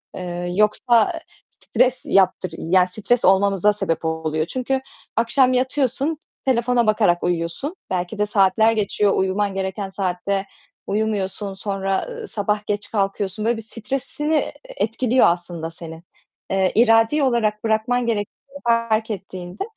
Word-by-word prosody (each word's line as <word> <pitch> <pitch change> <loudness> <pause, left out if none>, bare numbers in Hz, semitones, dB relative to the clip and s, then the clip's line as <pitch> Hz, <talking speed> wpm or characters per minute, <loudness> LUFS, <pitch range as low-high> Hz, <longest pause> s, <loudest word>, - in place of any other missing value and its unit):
Eee, 175 -1 -4
yoksa 225 - +2 0.4
stres 255 0 +2
yaptır, 185 -2 +2
yani 180 +2 +3
stres 215 +6 0
olmamıza 195 +1 +4
sebep 165 -5 -2
oluyor. 160 -1 -1
Çünkü 260 +5 -2 0.3
akşam 255 +3 +3
yatıyorsun, 270 +3 0 0.3
telefona 240 -2 +2
bakarak 205 -5 +3
uyuyorsun. 175 - -2
Belki 180 +3 -2
de 210 - +2
saatler 210 +2 +3
geçiyor, 210 -2 +1
uyuman 195 +1 0
gereken 195 +1 -3
saatte 195 +1 -2 0.4
uyumuyorsun. 200 -1 -2
Sonra, 195 -1 -2
ııı, 470 -2 -7
sabah 210 - -2
geç 205 0 -3
kalkıyorsun. 200 0 -1
Böyle 235 0 +1
bir - - -5
stresini, 270 +7 -3
eee, 300 - 0
etkiliyor 255 - +1
aslında 170 -1 -2
senin. 165 0 -10 0.5
Eee, 190 -1 +2
iradi 225 +5 +4
olarak 220 -5 +1
bırakman 225 +3 +1
gerektiğini 235 +6 -4
fark 230 -1 +1
ettiğinde 185 -2 -6
210 Hz, 125 wpm, -21 LUFS, 190-235 Hz, 0.5 s, olmamıza